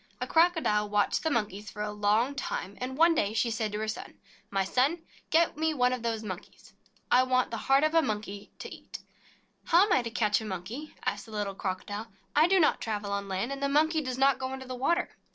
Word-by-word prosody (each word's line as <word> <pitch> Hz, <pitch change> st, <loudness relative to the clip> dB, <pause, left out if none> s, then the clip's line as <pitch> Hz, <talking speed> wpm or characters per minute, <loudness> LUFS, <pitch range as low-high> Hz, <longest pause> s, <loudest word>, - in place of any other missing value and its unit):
A -, -, -2 dB
Crocodile 320 Hz, -12 st, +2 dB
watched 205 Hz, 0 st, +1 dB
the 320 Hz, -, 0 dB
Monkeys 210 Hz, -6 st, -2 dB
for 210 Hz, -, -5 dB
a 210 Hz, -, -3 dB
long 210 Hz, +6 st, +1 dB
time, 205 Hz, -7 st, -4 dB
and 260 Hz, +1 st, -4 dB
one 330 Hz, +2 st, +6 dB
day 210 Hz, -9 st, 0 dB
she 230 Hz, +1 st, +1 dB
said 220 Hz, -1 st, -2 dB
to 210 Hz, -, -3 dB
her 220 Hz, 0 st, -3 dB
son: 215 Hz, -, -6 dB, 0.3 s
"My 195 Hz, -1 st, 0 dB
son, 275 Hz, -, +1 dB, 0.3 s
get 330 Hz, +1 st, +3 dB
one 295 Hz, -5 st, +1 dB
of 250 Hz, -, -3 dB
those 225 Hz, -1 st, -2 dB
Monkeys 185 Hz, -4 st, -9 dB
for -, -, -26 dB
me. -, -, -40 dB, 0.3 s
I 250 Hz, -, +7 dB
want 255 Hz, -1 st, +1 dB
the 230 Hz, -, -3 dB
heart 270 Hz, +2 st, +5 dB
of 310 Hz, +1 st, +2 dB
a 330 Hz, -, +5 dB
Monkey 210 Hz, -5 st, -4 dB
to -, -, -8 dB
eat." -, -, -9 dB, 0.7 s
"How 350 Hz, +4 st, +5 dB
am 410 Hz, -, +1 dB
I -, -, +4 dB
to 235 Hz, -, -5 dB
catch 220 Hz, -2 st, +1 dB
a -, -, -6 dB
Monkey?" 215 Hz, -, -6 dB
asked 205 Hz, +3 st, -2 dB
the -, -, -12 dB
little 205 Hz, -2 st, -3 dB
Crocodile. 200 Hz, +3 st, -4 dB, 0.3 s
"I 305 Hz, +3 st, +6 dB
do 380 Hz, +1 st, +4 dB
not 315 Hz, -, +3 dB
travel 210 Hz, -2 st, -3 dB
on 200 Hz, 0 st, -2 dB
land, 195 Hz, +6 st, -2 dB
and 275 Hz, 0 st, -5 dB
the 280 Hz, -, +1 dB
Monkey 315 Hz, +3 st, +3 dB
does 255 Hz, -3 st, -4 dB
not 270 Hz, 0 st, +3 dB
go 260 Hz, 0 st, -3 dB
into 265 Hz, 0 st, -7 dB
the 255 Hz, -, -5 dB
water." 340 Hz, +8 st, 0 dB
235 Hz, 240 wpm, -29 LUFS, 210-285 Hz, 0.7 s, I